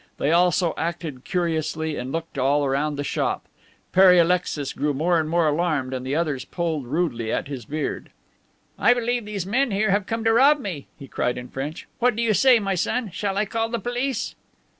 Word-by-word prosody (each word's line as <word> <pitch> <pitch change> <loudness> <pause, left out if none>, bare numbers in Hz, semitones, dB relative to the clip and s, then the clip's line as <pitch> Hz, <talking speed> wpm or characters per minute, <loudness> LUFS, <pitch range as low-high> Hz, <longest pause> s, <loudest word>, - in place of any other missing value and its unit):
They 145 - +1
also 175 0 +3
acted 160 -5 -4
curiously 160 -3 -1
and 125 0 -5
looked 165 -3 -4
all 140 +2 +2
around 145 +2 0
the 145 - -3
shop. - - -1 0.5
Pere 190 -1 +7
Alexis 170 -5 +1
grew 145 -1 -1
more 170 +4 +2
and 155 -1 -2
more 170 -1 +2
alarmed 150 -4 0
and 130 -1 -3
the 130 +2 -2
others 150 -5 -1
pulled 160 -7 -3
rudely 125 -7 -1
at - - -1
his 135 -5 -6
beard. 150 +5 -4 0.7
"I 245 - +5
believe 240 -1 -1
these 205 -4 -4
men 250 +7 +1
here 205 0 +1
have 200 0 +1
come 225 0 -2
to 225 0 +3
rob 280 +5 +5
me," 180 - -6
he 140 - -10
cried 125 -1 -1
in 125 0 -7
French. 145 +5 -6
"What 245 -1 +3
do 235 - -1
you 225 -2 +2
say, 255 +3 +6
my 195 -2 -1
son? 205 +4 -1
Shall 195 +2 -2
I 210 - +2
call 225 +2 -2
the 235 - -1
police?" 245 +3 -2
170 Hz, 205 wpm, -23 LUFS, 145-210 Hz, 0.7 s, Pere